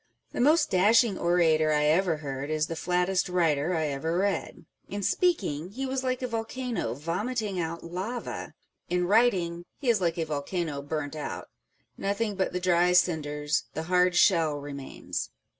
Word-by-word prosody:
The - - -2
most 300 +4 +4
dashing 210 +3 +4
orator 160 -3 +3
I 150 0 +2
ever 165 +2 +3
heard 140 -1 -5
is 155 0 +1
the 165 - -5
flattest 180 +2 0
writer 165 -2 +1
I 160 -1 0
ever 160 +5 -2
read. 200 +1 -2 0.2
In 205 0 -4
speaking, 185 - 0
he 265 +4 -3
was 265 0 -2
like 255 0 -1
a - - 0
volcano 230 - -3
vomiting 195 - -2
out 165 0 -3
lava; 190 +8 -5 0.3
in 180 0 +1
writing, 185 -5 +2
he 270 - -2
is 215 -4 0
like 170 -2 0
a 165 - 0
volcano 150 0 -3
burnt 145 0 -4
out. 150 - -5 0.5
Nothing 205 +2 -1
but 190 -1 0
the 180 - -2
dry 180 0 +3
cinders, 150 -4 +1
the 160 - -2
hard 180 +1 +2
shell 165 -5 +4
remains. 140 -1 -5
180 Hz, 160 wpm, -28 LUFS, 155-205 Hz, 0.5 s, most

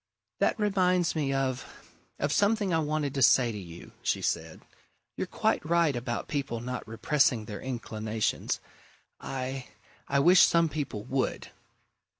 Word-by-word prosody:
"That - - +2
reminds 185 -4 +2
me 145 -3 0
of 130 -2 -1 0.5
of 145 +1 0
something 205 -2 +2
I 165 - +3
wanted 150 -2 -1
to 135 - -2
say 120 -1 +5
to 105 - -6
you," 85 -2 -11
she - - 0
said. 80 -1 -2 0.5
"You're - - -3
quite - - 0
right 165 -3 +2
about 120 0 -3
people 140 -5 -2
not 125 +1 -5
repressing 120 0 +1
their 105 0 -7
inclinations. 110 -4 -2 0.6
I 130 0 -4 0.4
I 140 - +1
wish 175 +6 +6
some 170 -1 +5
people 140 -9 -4
would!" 130 +2 -2
135 Hz, 145 wpm, -29 LUFS, 120-160 Hz, 0.6 s, wish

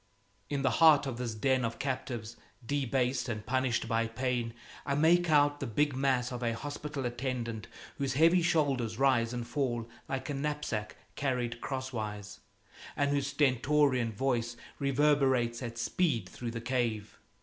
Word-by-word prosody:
In 140 -1 -1
the 135 - +3
heart 155 -3 +7
of 125 -3 -4
this 120 -3 -3
den 130 +3 +2
of 115 0 -2
captives, 120 -4 -4 0.3
debased 130 -1 0
and 105 -2 -4
punished 130 -1 0
by 115 0 +1
pain, 120 -1 -2 0.3
I 140 - -1
make 170 +3 +4
out 145 -1 +4
the - - -3
big 145 +5 +1
mass 130 -2 +1
of 125 -1 -5
a 115 -1 0
hospital 145 +1 -5
attendant 120 -3 -3 0.3
whose 135 -1 0
heavy 165 +4 +5
shoulders 140 -9 +1
rise 125 -4 +3
and 120 -1 -4
fall 120 -5 -1 0.2
like 135 -1 -3
a - - -2
knapsack 140 -7 -3 0.2
carried 125 -4 -2
crosswise, 110 -7 -4 0.6
and 140 0 +1
whose 140 -1 +1
stentorian 140 -2 +2
voice 120 0 -1 0.2
reverberates 135 -4 +2
at 115 -2 -5
speed 115 - 0
through 120 +5 -6
the 115 0 -5
cave. 115 -3 -2
130 Hz, 150 wpm, -31 LUFS, 115-140 Hz, 0.6 s, heart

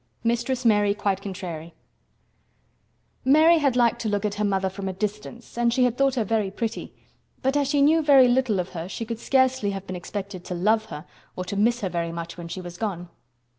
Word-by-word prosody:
MISTRESS 240 +2 -1
MARY 205 -2 +4
QUITE 200 -2 -1
CONTRARY 175 -4 -7 1.5
Mary 315 +5 +5
had 275 -4 +1
liked 240 -1 +2
to 220 - -1
look 205 0 -1
at 205 - -1
her 210 - -2
mother 195 -2 +1
from 190 0 -5
a - - -4
distance 210 +4 -5
and 235 0 +3
she 250 +2 +2
had 245 -2 +2
thought 275 0 +2
her 235 - +1
very 215 -1 0
pretty, 225 +3 -4 0.5
but 265 +2 +1
as 285 -1 +2
she 285 0 +2
knew 320 +3 +4
very 275 -4 +6
little 245 -5 +2
of 180 0 -3
her 170 0 -6
she 230 - -5
could 230 0 -5
scarcely 260 -4 +2
have 195 -1 -5
been 185 - -6
expected 190 +1 -6
to 180 - -4
love 215 +5 +2
her 155 -8 -8 0.3
or 185 - -4
to 200 - -5
miss 235 +4 +2
her 190 - -1
very 170 -1 -2
much 170 0 -6
when 170 -1 -8
she 185 +2 -6
was 175 -1 -9
gone. 180 -6 -4
210 Hz, 215 wpm, -24 LUFS, 190-245 Hz, 1.5 s, very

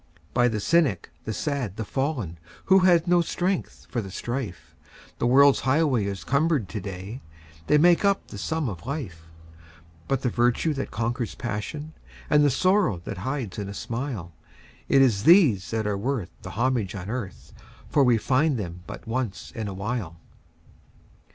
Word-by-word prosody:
By 120 0 +4
the 110 -3 -1
cynic, 130 - +1
the 110 - -2
sad, 135 - -2
the 110 - -4
fallen, 125 - -2 0.3
Who 190 0 +6
had 175 -2 +4
no 175 0 +4
strength 180 +2 -2
for 120 - -2
the 95 - -8
strife, 120 -1 -5 0.4
The - - +1
world's 140 +2 +6
highway 130 -4 +2
is 100 -5 -4
cumbered 140 - +1
to 105 - -4
day 100 +5 -7 0.5
They 150 - +5
make 175 +4 +5
up 200 -1 +2
the - - -8
sum 160 -3 -1
of 100 0 -6
life; 95 - -5 0.8
But 135 -1 0
the 125 - +1
virtue 120 +7 +2
that 135 -1 -4
conquers 120 0 -2
passion, 130 +7 -5 0.4
And 150 -1 +6
the 145 - +5
sorrow 185 - +2
that 95 - -5
hides 120 -2 -3
in 100 -1 -4
a 100 - -7
smile 115 -9 -4 0.6
It 135 -1 +6
is 110 -7 +2
these 140 - +5
that 110 -1 -1
are 105 -1 -1
worth 125 -3 -2
the - - -8
homage 115 -3 0
on 95 -1 -6
earth, 110 -4 -6 0.3
For 145 - +3
we 125 -3 +4
find 135 +4 +2
them 90 -4 -5
but - - -8
once 115 -3 -3
in 110 -2 -5
a 100 - -4
while. 100 -5 -4
120 Hz, 170 wpm, -25 LUFS, 100-145 Hz, 0.8 s, Who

